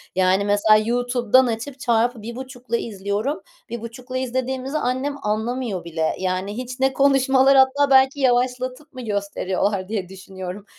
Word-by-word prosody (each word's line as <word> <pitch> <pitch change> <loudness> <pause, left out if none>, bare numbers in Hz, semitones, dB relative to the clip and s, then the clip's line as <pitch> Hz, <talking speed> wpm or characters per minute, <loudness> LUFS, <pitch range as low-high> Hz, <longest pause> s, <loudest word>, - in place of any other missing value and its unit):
Yani, 190 +2 +2
mesela 205 +1 +4
YouTube'dan 245 +1 +2
açıp 230 +3 -3
çarpı 235 -1 +1
1,5 245 +1 -5
izliyorum. 210 +6 -3 0.3
1,5 235 +2 -6
izlediğimizi 260 +2 -2
annem 260 +1 -1
anlamıyor 220 -1 -2
bile. 160 -1 -2
Yani, 185 +3 -2
hiç 255 +1 -6
ne 265 0 +2
konuşmalar 270 0 +4
hatta 270 +2 +4
belki 265 +1 +4
yavaşlatıp 255 +2 0
mı 255 - -8
gösteriyorlar 200 -2 -2
diye 200 -4 -3
düşünüyorum. 190 0 -8
245 Hz, 130 wpm, -22 LUFS, 205-260 Hz, 0.3 s, mesela